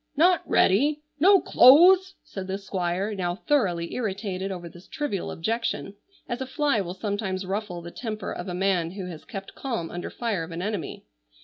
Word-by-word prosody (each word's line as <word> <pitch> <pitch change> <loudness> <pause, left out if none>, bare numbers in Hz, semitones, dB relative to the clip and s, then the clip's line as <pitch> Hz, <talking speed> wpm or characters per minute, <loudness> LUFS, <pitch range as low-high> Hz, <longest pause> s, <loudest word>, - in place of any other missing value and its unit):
"Not 355 +3 +5
ready! 290 +10 +3 0.2
No 385 +5 +7
clothes!" 360 +9 +6
said 190 -2 -7
the 190 0 -2
Squire, 190 +1 -2
now 175 -3 -2
thoroughly 190 - 0
irritated 195 -4 -3
over 175 -2 -6
this 175 +2 -14
trivial 290 - -3
objection, 220 +2 -2 0.3
as 240 +1 -4
a 265 - -3
fly 280 -4 +1
will 180 -1 -5
sometimes 195 -1 -3
ruffle 190 -3 -4
the 170 - -8
temper 215 -3 -5
of 175 - -6
a 180 - -4
man 180 -3 +1
who 195 -2 -6
has 160 - -10
kept 195 -4 -8
calm 230 -11 -4
under 175 - -5
fire 225 -7 -2
of 160 - -8
an 170 +1 -5
enemy. 205 -5 -4
195 Hz, 180 wpm, -26 LUFS, 180-245 Hz, 0.3 s, No